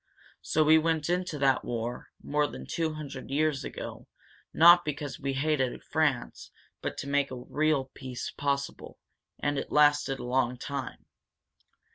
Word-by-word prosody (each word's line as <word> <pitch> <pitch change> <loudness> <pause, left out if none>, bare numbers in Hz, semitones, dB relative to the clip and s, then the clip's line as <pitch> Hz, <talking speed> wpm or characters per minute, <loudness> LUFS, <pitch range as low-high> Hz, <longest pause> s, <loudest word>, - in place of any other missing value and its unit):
So 155 - +2
we 160 +1 +6
went 160 0 0
into 180 -3 -1
that 135 -2 +2
war, 120 +1 -4 0.2
more 150 0 +1
than - - -8
two 160 -2 -2
hundred 140 -3 -7
years 145 -1 +1
ago, - - -7 0.4
not 175 +2 +8
because 145 -1 -4
we 140 -1 -2
hated 135 -2 0
France, 150 -6 -1 0.3
but - - -4
to - - -5
make 140 0 +1
a 130 - -6
real 150 -3 +1
peace 130 -2 -6
possible. 140 -1 -3 0.4
And 145 -1 -1
it - - -6
lasted 145 -2 +4
a - - -7
long 125 0 0
time. 135 -1 -6
145 Hz, 150 wpm, -29 LUFS, 135-155 Hz, 0.4 s, not